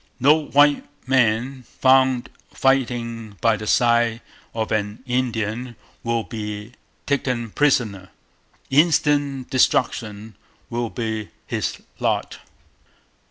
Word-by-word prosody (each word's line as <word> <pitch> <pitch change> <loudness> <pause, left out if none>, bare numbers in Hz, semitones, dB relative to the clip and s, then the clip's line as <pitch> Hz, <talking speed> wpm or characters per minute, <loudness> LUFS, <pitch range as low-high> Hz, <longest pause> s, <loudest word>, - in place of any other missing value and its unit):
No 150 +4 +4
white 145 +1 +4 0.2
man 130 0 +2
found 130 0 +2 0.2
fighting 115 -5 0
by 115 -1 +3
the 105 0 -7
Side 120 -1 +3 0.3
of 110 -1 -3
an 105 +2 -2
Indian 120 -1 -2 0.3
will 115 -1 0
be 105 -1 -6 0.3
taken 125 -5 -1
prisoner. 110 -10 +1 0.6
Instant 145 -3 +2
destruction 110 -4 +1 0.4
will 120 0 -2
be 110 -3 -4 0.2
his - - -3 0.2
Lot... - - -1
120 Hz, 95 wpm, -22 LUFS, 110-130 Hz, 0.6 s, No